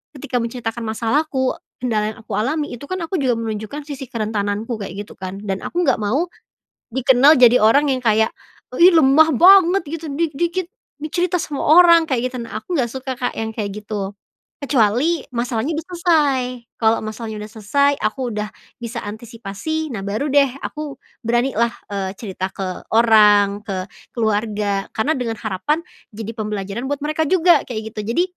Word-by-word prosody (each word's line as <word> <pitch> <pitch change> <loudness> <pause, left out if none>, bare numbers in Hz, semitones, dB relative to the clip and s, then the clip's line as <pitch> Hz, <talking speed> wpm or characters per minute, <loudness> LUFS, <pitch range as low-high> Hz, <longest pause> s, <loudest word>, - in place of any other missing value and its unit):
ketika 255 -2 -3
menceritakan 235 -1 -4
masalahku 260 +5 0 0.2
kendala 215 -4 0
yang - - -15
aku 215 - -8
alami 290 +8 0
itu 245 - -13
kan 370 - -2
aku 350 +3 -3
juga 250 -4 +1
menunjukkan 220 +5 -5
sisi 275 -2 -6
kerentananku 215 0 -2
kayak 200 +1 -6
gitu - - -12
kan 190 +1 -6
dan 195 -2 -2
aku 350 - -1
gak - - +3
mau, 275 +12 +1 0.7
dikenal 265 +3 +5
jadi 245 0 +7
orang 275 +7 +4
yang 260 - +1
kayak, 220 -1 +3 0.5
"Ih, 355 +2 +8
lemah 315 +2 +6
banget 375 +3 +6
gitu 330 0 -5
dikit-dikit 335 +4 -1 0.3
dicerita 350 +3 0
sama 290 -3 -4
orang" 335 +1 +7
kayak 255 -1 0
gitu 255 - -6
nah 230 - -6
aku 350 +4 -3
gak 250 - +1
suka, 265 +1 -5
Kak, 245 - -2
yang 220 0 -2
kayak 205 -2 -3
gitu, 205 -2 -4 0.5
kecuali 270 +4 +2
masalahnya 240 +5 -1
udah 320 - -4
selesai, 320 -7 +2 0.4
kalau 225 0 +3
masalahnya 220 0 -6
udah 210 - -10
selesai 280 +7 +2
aku 220 +5 -2 0.2
udah 210 0 -2 0.3
bisa 235 0 -5
antisipasi 230 +8 -5
nah 200 - -4
baru 215 +9 -2
deh 280 -1 +5
aku 300 -3 -5 0.3
beranilah, 235 0 +1 0.2
eee, 195 -2 -2
cerita 190 -3 -4
ke 185 -2 -5
orang, 210 -3 +5
ke 185 -2 -4 0.3
keluarga 210 -3 0
karena 270 +8 +1
dengan 235 -3 -2
harapan 220 - -1 0.3
jadi 220 +1 -6
pembelajaran 210 +1 -4
buat 285 - -2
mereka 310 +1 0
juga 345 -4 +4
kayak 220 -2 -5
gitu 210 - -4
jadi, 345 - +3
235 Hz, 165 wpm, -20 LUFS, 215-295 Hz, 0.7 s, Ih